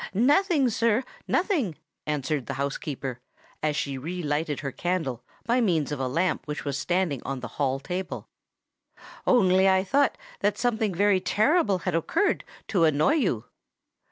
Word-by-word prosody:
"Nothing, 290 - +4
sir—nothing," 235 - 0 0.3
answered 150 -2 -1
the 140 - -3
housekeeper, 135 -2 -3 0.4
as 150 -1 0
she 140 -2 -2
re 175 +6 -4
lighted 145 -1 -1
her 140 -1 -3
candle 160 -10 -2 0.2
by 240 +2 +2
means 165 - +1
of 145 - -3
a 130 - 0
lamp 165 +4 0
which 150 -2 -4
was 140 -2 -1
standing 175 -3 0
on 135 -1 -4
the 125 - -4
hall 135 -1 +1
table; 180 +5 -5 1.0
"only 190 -5 +5
I 190 0 +3
thought 280 - +2 0.2
that 205 0 +1
something 220 -5 0
very 200 +1 +4
terrible 215 - +2
had - - 0
occurred 165 - +1 0.3
to 180 -5 +3
annoy 155 - +3
you." 195 - 0
180 Hz, 150 wpm, -26 LUFS, 145-220 Hz, 1.0 s, only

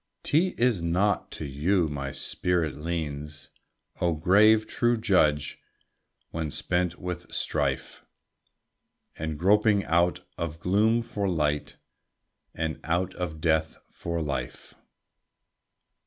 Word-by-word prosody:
'T 175 +5 +2
is 120 -7 +2
not 90 +5 +1
to - - -6
you, 80 +6 +1
my 70 -2 -4
spirit 85 -2 0
leans, 75 -2 -5 0.5
O 85 -1 +2
grave, 105 +7 +5
true 120 0 +1
judge! 75 -9 +2 0.7
When 80 -1 -3
spent 90 +3 -1
with 90 -1 -6
strife, - - -1 1.1
And 80 -1 -4
groping 100 +3 +3
out 85 +1 +2 0.2
of 80 -1 -4
gloom 110 +6 +2
for 100 -4 -2
light, 75 -4 -1 0.8
And 80 -1 -2
out 90 +3 0
of 80 -4 -4
death 80 -1 +1
for 85 -1 -4
life. 70 -5 -4
85 Hz, 110 wpm, -27 LUFS, 75-100 Hz, 1.1 s, grave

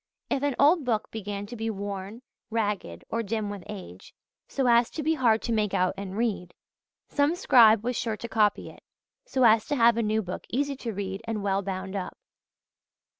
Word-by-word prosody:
If 270 - +1
an 285 -2 0
old 305 +3 +5
book 230 -4 -1
began 205 -2 -5
to 235 +4 -8
be 225 0 -3
worn, 200 +2 -5 0.3
ragged, 205 - -2
or 230 - 0
dim 215 -1 -2
with 200 -2 -7
age, 180 - -10 0.3
so 270 - -1
as 235 -1 +4
to 310 - -5
be 315 +2 +2
hard 235 -7 +2
to 235 - -2
make 210 -2 0
out 185 0 +2
and 195 0 -6
read, 210 -6 -2 0.5
some 290 +3 +1
scribe 225 - +6
was 245 +1 -1
sure 225 -2 -2
to 235 - -6
copy 210 -3 +1
it, - - -18 0.5
so 260 - +1
as 220 -1 +5
to 290 - 0
have 235 -2 +5
a - - +2
new 215 0 0
book 180 -1 -7
easy 280 +3 -1
to 235 -3 -4
read 195 -1 -4
and 220 -3 -3
well 195 -1 +1
bound 190 0 -5
up. 185 -2 -5
220 Hz, 200 wpm, -27 LUFS, 200-240 Hz, 0.5 s, scribe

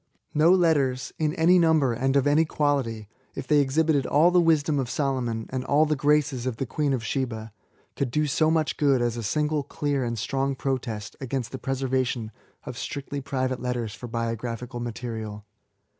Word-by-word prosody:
No 155 +3 +5
letters, 145 -8 +2
in 155 0 0
any 180 +2 +5
number 160 -7 +3
and 135 +4 0
of 140 -1 +3
any 145 +2 +4
quality, 135 -9 -1
— 130 - -37
if - - -5
they 150 +3 +4
exhibited 145 0 +2
all 160 +5 +4
the 180 0 +5
wisdom 155 -3 +2
of 130 -3 -2
Solomon, 125 -5 -1
and 130 -1 -2
all 145 +3 +3
the 155 0 +1
graces 145 -3 +1
of 120 -3 -3
the 135 - -2
Queen 145 +3 -1
of 125 -4 -1
Sheba, 115 -4 -3 0.4
could 140 - -1
do 150 +5 +1
so 155 +2 +2
much 160 -1 +1
good 140 -3 +3
as 120 -1 0
a 120 - -4
single 150 +7 0
clear 145 -1 -2
and 115 -1 -2
strong 135 +5 -1
protest 125 -6 -3
against 130 -2 -3
the 130 - -6
preservation 130 -4 -1 0.3
of - - -7
strictly 140 0 -5
private 130 -2 -2
letters 120 -4 -2
for 120 - -8
biographical 115 +1 -4
material. 110 -3 -5
135 Hz, 185 wpm, -26 LUFS, 120-150 Hz, 0.4 s, No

